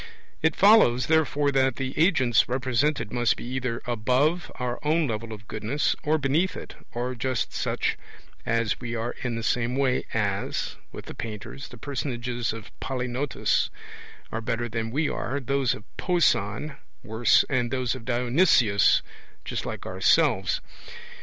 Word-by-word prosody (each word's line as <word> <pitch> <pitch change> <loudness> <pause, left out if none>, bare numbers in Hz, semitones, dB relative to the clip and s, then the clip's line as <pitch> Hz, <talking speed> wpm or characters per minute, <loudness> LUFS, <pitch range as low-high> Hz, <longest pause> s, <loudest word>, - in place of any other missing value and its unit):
It 160 -1 +2
follows, 195 - +6
therefore, 150 -2 +2
that 135 -2 +2
the 135 -1 -4
agents 130 - +3
represented 130 0 0
must 120 -1 +2
be - - -7
either 125 -1 -3
above 130 +9 +1
our 125 -1 -3
own 155 +2 +2
level 115 -2 -4
of 105 0 -9
goodness, 110 +7 -1
or 155 +1 +2
beneath 155 +6 +1
it, - - -8 0.2
or 125 +1 -3
just 125 0 -2
such - - -1 0.4
as 115 -2 0
we 120 -1 -4
are 115 +1 -2
in 125 -2 -2
the 115 - -4
same 125 +2 0
way 130 -2 +1
as, 100 -3 -1 0.2
with - - -9
the - - -8
painters, 110 +5 -7
the 120 - -12
personages 120 -2 -3
of 115 0 -8
Polygnotus 130 +1 -1 0.6
are 110 - -3
better 120 0 -2
than 115 -1 -3
we 145 +6 0
are, 140 +1 -2
those 135 -1 0
of - - -11
Pauson 150 - +1 0.3
worse, 110 +2 +3
and 125 -3 0
those 130 -1 -1
of 130 -3 -7
Dionysius 120 - +3 0.4
just - - -3
like - - -5
ourselves. - - +2
125 Hz, 150 wpm, -26 LUFS, 115-140 Hz, 0.6 s, follows